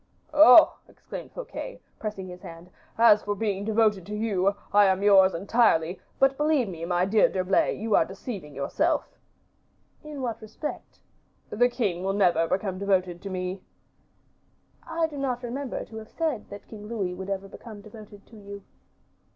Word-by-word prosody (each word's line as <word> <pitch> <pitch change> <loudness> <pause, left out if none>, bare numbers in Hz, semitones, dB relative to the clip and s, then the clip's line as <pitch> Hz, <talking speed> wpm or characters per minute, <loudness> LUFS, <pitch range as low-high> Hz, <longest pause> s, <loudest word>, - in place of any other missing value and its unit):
"Oh!" 300 0 +8
exclaimed - - -10
Fouquet, - - -7 0.2
pressing 210 -3 -5
his 180 0 -10
hand, 170 +2 -12 0.3
"as 220 -2 +6
for 205 0 -3
being 200 -1 -2
devoted 215 -3 +2
to 210 - -5
you, 200 -3 0 0.2
I 205 0 +6
am 190 0 +1
yours, 195 -2 +6
entirely; 185 -3 +2 0.2
but 270 0 +3
believe 295 -5 +2
me, 165 -3 -6
my 175 +1 +1
dear 210 +2 +3
D'Herblay, 185 0 +1
you 220 0 0
are - - +5
deceiving 190 - -8
yourself." 140 - 0 1.0
"In 300 -3 -7
what 235 -3 -4
respect?" 220 +8 -8 0.5
"The 245 +3 +3
king 200 -8 -2
will 195 +1 0
never 175 -4 +2
become 190 0 -2
devoted 185 -3 0
to 200 - -6
me." 185 0 -4 1.3
"I 330 0 0
do 305 -2 -7
not 255 -2 -2
remember 255 +2 -4
to 220 - -11
have 220 0 -9
said 310 -10 -3
that 205 0 -11
King 210 -2 -10
Louis 200 -6 -3
would 190 +2 -7
ever 195 0 -3
become 210 +1 -11
devoted 210 -1 -13
to 230 - -17
you." 200 -1 -10
205 Hz, 165 wpm, -26 LUFS, 190-230 Hz, 1.3 s, Oh